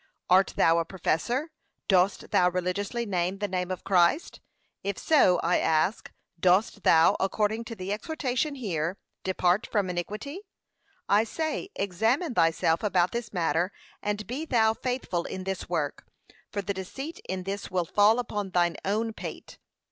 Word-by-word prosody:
Art 190 Hz, +1 st, +5 dB
thou 165 Hz, +1 st, +4 dB
a -, -, +1 dB
professor? 235 Hz, -, -1 dB, 0.4 s
Dost 190 Hz, 0 st, +2 dB
thou 180 Hz, 0 st, +4 dB
religiously 185 Hz, +6 st, -2 dB
name 185 Hz, -2 st, -1 dB
the 205 Hz, +1 st, -2 dB
name 180 Hz, -1 st, -2 dB
of 185 Hz, -, -4 dB
Christ? 180 Hz, -, +2 dB, 0.4 s
If 200 Hz, -1 st, -2 dB
so, 230 Hz, -, +4 dB
I 175 Hz, +2 st, +3 dB
ask, 160 Hz, +7 st, +1 dB, 0.3 s
dost 190 Hz, +4 st, +3 dB
thou, 160 Hz, -2 st, +5 dB
according 215 Hz, +3 st, 0 dB
to 230 Hz, -, -7 dB
the 190 Hz, 0 st, -3 dB
exhortation 280 Hz, +3 st, -2 dB
here, 180 Hz, -, -2 dB, 0.3 s
'Depart 185 Hz, +1 st, +1 dB
from 205 Hz, -4 st, +1 dB
iniqnity?' 210 Hz, -, -4 dB, 0.7 s
I 205 Hz, +2 st, +4 dB
say, 315 Hz, -, -3 dB
examine 225 Hz, -, 0 dB
thyself 165 Hz, -2 st, +2 dB
about 180 Hz, -4 st, +2 dB
this 235 Hz, -2 st, -4 dB
matter, 175 Hz, 0 st, 0 dB, 0.3 s
and 210 Hz, 0 st, -2 dB
be 260 Hz, +7 st, -4 dB
thou 225 Hz, -7 st, +3 dB
faithful 235 Hz, -9 st, -2 dB
in 190 Hz, -, -5 dB
this 190 Hz, 0 st, -4 dB
work, -, -, -2 dB, 0.4 s
for 200 Hz, -, -3 dB
the 200 Hz, -, -2 dB
deceit 270 Hz, -, -6 dB
in 185 Hz, 0 st, -3 dB
this 195 Hz, +2 st, -4 dB
will 180 Hz, -2 st, 0 dB
fall 205 Hz, +6 st, +4 dB
upon 210 Hz, -5 st, -3 dB
thine 175 Hz, -2 st, +1 dB
own 220 Hz, +3 st, -1 dB
pate. -, -, -8 dB
195 Hz, 155 wpm, -27 LUFS, 180-225 Hz, 0.7 s, Art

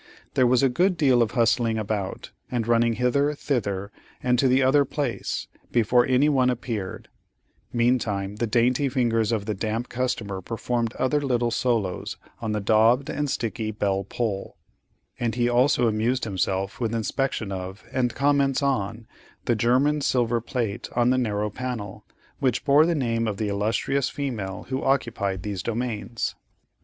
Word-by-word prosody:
There 130 Hz, -, +4 dB
was 125 Hz, +1 st, +3 dB
a -, -, +6 dB
good 175 Hz, +8 st, +2 dB
deal 130 Hz, -6 st, +4 dB
of 115 Hz, 0 st, +1 dB
hustling 115 Hz, -1 st, +2 dB
about, 105 Hz, -3 st, -3 dB, 0.2 s
and 120 Hz, -3 st, -2 dB
running 115 Hz, 0 st, +3 dB
hither, 140 Hz, +6 st, +1 dB
thither, 100 Hz, -8 st, -2 dB, 0.3 s
and 125 Hz, -1 st, +2 dB
to 135 Hz, -, +4 dB
the 130 Hz, +1 st, +4 dB
other 140 Hz, +2 st, +5 dB
place, 135 Hz, -6 st, -3 dB, 0.3 s
before 120 Hz, +1 st, +3 dB
any 130 Hz, +3 st, +4 dB
one 130 Hz, -4 st, +3 dB
appeared; 115 Hz, -6 st, -4 dB, 0.6 s
meantime, 110 Hz, -5 st, 0 dB
the 120 Hz, -, 0 dB
dainty 125 Hz, +5 st, +2 dB
fingers 115 Hz, -4 st, +1 dB
of 110 Hz, -3 st, -1 dB
the 110 Hz, -, -1 dB
damp 110 Hz, +4 st, -3 dB
customer 120 Hz, -6 st, -2 dB
performed 115 Hz, +2 st, -2 dB
other 140 Hz, +3 st, +1 dB
little 120 Hz, -4 st, 0 dB
solos 115 Hz, -7 st, -1 dB, 0.2 s
on 110 Hz, -2 st, -2 dB
the 105 Hz, -, 0 dB
daubed 115 Hz, +8 st, +3 dB
and 145 Hz, -1 st, -2 dB
sticky 115 Hz, -3 st, -2 dB
bell 100 Hz, -2 st, -1 dB
pull,—and 110 Hz, +2 st, -5 dB
he 120 Hz, -1 st, +2 dB
also 120 Hz, 0 st, +3 dB
amused 115 Hz, +4 st, 0 dB
himself 95 Hz, -1 st, -1 dB
with 115 Hz, -2 st, -1 dB
inspection 115 Hz, -1 st, -1 dB
of, 95 Hz, +2 st, -6 dB
and 125 Hz, -3 st, 0 dB
comments 140 Hz, 0 st, +2 dB
on, 115 Hz, -4 st, -1 dB, 0.4 s
the -, -, +2 dB
German 130 Hz, +7 st, +2 dB
silver 120 Hz, -3 st, +1 dB
plate 115 Hz, -3 st, -3 dB
on 120 Hz, 0 st, +3 dB
the 130 Hz, -, +2 dB
narrow 105 Hz, -3 st, -1 dB
panel, 115 Hz, -4 st, -5 dB, 0.3 s
which 130 Hz, -2 st, 0 dB
bore 145 Hz, +3 st, +6 dB
the 170 Hz, -, +1 dB
name 115 Hz, -5 st, 0 dB
of 105 Hz, -2 st, -2 dB
the 105 Hz, -1 st, -1 dB
illustrious 115 Hz, +6 st, 0 dB
female 110 Hz, -10 st, -4 dB
who 130 Hz, 0 st, -1 dB
occupied 100 Hz, -8 st, 0 dB
these 100 Hz, -3 st, -3 dB
domains. 115 Hz, -1 st, -3 dB
120 Hz, 155 wpm, -25 LUFS, 105-130 Hz, 0.6 s, a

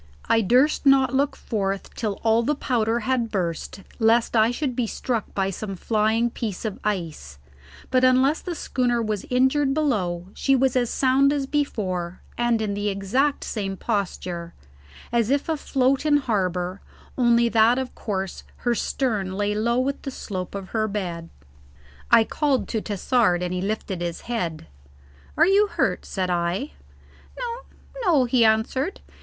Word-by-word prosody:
I 225 Hz, -, +4 dB
durst 255 Hz, +9 st, +3 dB
not 270 Hz, -1 st, +5 dB
look 275 Hz, +2 st, +1 dB
forth 195 Hz, -3 st, -3 dB
till 215 Hz, -3 st, -2 dB
all 225 Hz, 0 st, +4 dB
the 295 Hz, +6 st, 0 dB
powder 235 Hz, -4 st, 0 dB
had 240 Hz, 0 st, 0 dB
burst, 180 Hz, -1 st, -3 dB, 0.2 s
lest 230 Hz, +1 st, +3 dB
I 220 Hz, 0 st, +5 dB
should 250 Hz, +1 st, -2 dB
be 240 Hz, -2 st, 0 dB
struck 230 Hz, -1 st, -3 dB
by 195 Hz, -1 st, 0 dB
some 195 Hz, +1 st, -5 dB
flying 220 Hz, +4 st, +1 dB
piece 220 Hz, -3 st, -4 dB
of 210 Hz, -3 st, -4 dB
ice, 165 Hz, -, -3 dB, 0.5 s
but 255 Hz, 0 st, +3 dB
unless 260 Hz, +4 st, +4 dB
the 355 Hz, -2 st, -5 dB
schooner 245 Hz, -5 st, 0 dB
was 215 Hz, -3 st, -2 dB
injured 265 Hz, +2 st, +2 dB
below 190 Hz, -, 0 dB
she 270 Hz, -, +2 dB
was 265 Hz, 0 st, +2 dB
as 245 Hz, -2 st, +2 dB
sound 270 Hz, +1 st, +3 dB
as 285 Hz, -2 st, -1 dB
before, 190 Hz, -12 st, -2 dB
and 240 Hz, -2 st, +1 dB
in 205 Hz, -2 st, -1 dB
the 205 Hz, +1 st, -1 dB
exact 210 Hz, +9 st, 0 dB
same 195 Hz, -3 st, -3 dB
posture, 180 Hz, -5 st, -3 dB, 0.6 s
as 235 Hz, -2 st, +1 dB
if 280 Hz, +1 st, +1 dB
afloat 275 Hz, -4 st, +1 dB
in 300 Hz, -1 st, +4 dB
harbour, 185 Hz, -7 st, -1 dB, 0.3 s
only 235 Hz, -2 st, +4 dB
that 230 Hz, +2 st, +4 dB
of 260 Hz, -1 st, -3 dB
course 195 Hz, -3 st, -4 dB, 0.2 s
her 240 Hz, -, +3 dB
stern 215 Hz, -5 st, -1 dB
lay 205 Hz, +1 st, 0 dB
low 235 Hz, +3 st, +1 dB
with 270 Hz, +2 st, -1 dB
the 275 Hz, -, -5 dB
slope 190 Hz, -8 st, -6 dB
of 195 Hz, -1 st, -6 dB
her 215 Hz, -1 st, 0 dB
bed. 175 Hz, -5 st, -4 dB, 0.8 s
I 225 Hz, -, +7 dB
called 280 Hz, +2 st, 0 dB
to 220 Hz, -, -1 dB
Tassard 205 Hz, -3 st, +1 dB
and 180 Hz, 0 st, -2 dB
he 180 Hz, -, -2 dB
lifted 195 Hz, -2 st, -3 dB
his 170 Hz, -1 st, -3 dB
head. 175 Hz, -, -3 dB, 0.7 s
"Are 320 Hz, -, +6 dB
you 400 Hz, +3 st, +4 dB
hurt?" -, -, -1 dB
said 185 Hz, -2 st, -2 dB
I. 175 Hz, -, -1 dB, 0.7 s
"No, 480 Hz, -1 st, -4 dB, 0.4 s
no," 315 Hz, -, +4 dB
he 240 Hz, 0 st, +3 dB
answered. 225 Hz, -, +1 dB
230 Hz, 160 wpm, -24 LUFS, 195-260 Hz, 0.8 s, I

